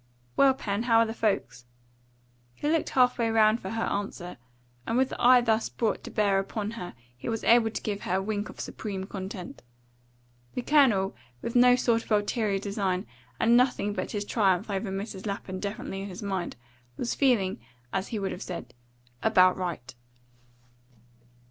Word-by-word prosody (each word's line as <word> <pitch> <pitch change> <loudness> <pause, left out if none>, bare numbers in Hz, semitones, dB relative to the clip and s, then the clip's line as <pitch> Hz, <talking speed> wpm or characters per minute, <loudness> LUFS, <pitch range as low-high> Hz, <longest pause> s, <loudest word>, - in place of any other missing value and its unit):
Well, 270 -1 +5
Pen, 205 -5 -2
how 235 -1 +3
are 230 - +5
the 225 - -4
folks?" 200 - -1 0.9
He - - -3
looked 320 +1 +1
half 250 -1 +3
way 230 -1 +2
round 220 0 +4
for 190 - -5
her 225 +1 -2
answer, 195 -4 -4 0.5
and 230 - +1
with 260 +1 +3
the - - -6
eye 250 0 +7
thus 225 -2 +1
brought 225 -2 -1
to - - -7
bear 200 -2 +2
upon 205 +2 -3
her 180 -6 -7 0.2
he 125 - -6
was 225 -1 -2
able 230 -1 +5
to - - -5
give 205 -2 -3
her 185 - -1
a 190 - +1
wink 210 0 -2
of - - -12
supreme 195 -3 -5
content. 190 -1 -7 0.9
The 250 - -2
Colonel, 240 -11 +3 0.3
with 235 - -4
no 245 0 +7
sort 235 -2 +1
of - - -17
ulterior 210 0 +1
design, 195 -2 -2 0.3
and 235 +1 +4
nothing 245 -5 +2
but - - -3
his 205 -1 -3
triumph 200 -2 +1
over 195 +1 -2
Mrs. 195 +1 -5
Lapham 195 -2 -4
definitely 200 -1 -4
in 200 - -6
his 185 +2 -8
mind, 190 -3 -3 0.4
was 240 - -1
feeling, 225 - +2 0.3
as 190 0 -1
he 225 - -4
would 195 -2 -2
have 180 - -7
said, 170 - -6 0.5
about 185 -4 +5
right. 160 -9 -5
205 Hz, 180 wpm, -28 LUFS, 190-230 Hz, 0.9 s, eye